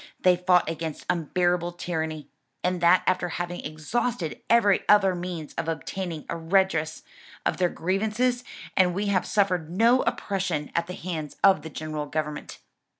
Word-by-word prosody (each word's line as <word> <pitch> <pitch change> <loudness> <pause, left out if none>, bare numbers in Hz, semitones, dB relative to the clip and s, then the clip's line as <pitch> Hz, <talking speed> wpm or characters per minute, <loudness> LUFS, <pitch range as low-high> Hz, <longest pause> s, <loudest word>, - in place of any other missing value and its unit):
"They 180 -1 +5
fought 180 0 +3
against 160 -1 -4
unbearable 175 +1 0
tyranny; 160 -4 -4 0.4
and 180 -1 0
that 175 +2 +5
after 185 -1 +1
having 175 +1 -4
exhausted 160 +3 -2
every 215 -4 +5
other 195 -2 +6
means 175 -3 -5
of - - -3
obtaining 165 0 -4
a - - -3
redress 165 -2 +1 0.4
of - - +1
their 180 -1 +2
grievances; 220 +9 0 0.3
and 180 -2 +3
we 200 +2 -1
had 185 -3 +1
suffered 185 -6 +1
no 230 +8 +4
oppression 190 -7 -2
at 170 0 0
the 180 - -6
hands 160 -4 -5
of 190 -5 +6
the 160 - -7
general 155 -1 -5
government." 150 0 -4
175 Hz, 150 wpm, -26 LUFS, 160-190 Hz, 0.4 s, other